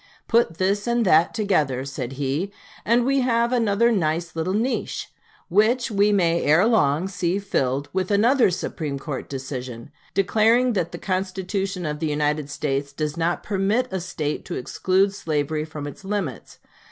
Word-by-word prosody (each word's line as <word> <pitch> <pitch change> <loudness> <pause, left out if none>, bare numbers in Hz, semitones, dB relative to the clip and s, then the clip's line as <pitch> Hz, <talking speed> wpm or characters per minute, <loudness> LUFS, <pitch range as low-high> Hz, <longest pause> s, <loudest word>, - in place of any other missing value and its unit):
"Put 230 -8 +2
this 200 +4 0
and 235 -1 +2
that 165 -2 +5
together," 150 - 0
said 135 -2 -5
he, 145 +8 -2 0.3
"and 235 +2 +3
we 275 +1 +2
have 235 -1 +1
another 235 -1 +3
nice 170 -4 -1
little 165 +3 -1
niche, 240 +5 -2 0.4
which 225 +6 +2
we 205 0 +3
may 170 -4 +2
ere 160 +7 +4
long 185 -7 +2
see 185 -1 -1
filled 140 -8 -1
with 185 -1 -1
another 230 +4 +4
Supreme 155 -5 -3
Court 135 0 -6
decision, 130 -3 -6 0.2
declaring 225 +6 +3
that 180 -5 -1
the - - -6
Constitution 190 0 -2
of 150 -1 -3
the 160 - -1
United 150 0 0
States 140 -1 -2
does 150 +1 -3
not 170 +1 -1
permit 210 +5 0
a 190 - 0
State 155 -4 -3
to - - -5
exclude 190 +9 +1
slavery 155 -3 -2
from 155 -2 -7
its 145 +5 -9
limits.... 190 - -4
185 Hz, 160 wpm, -23 LUFS, 150-210 Hz, 0.4 s, that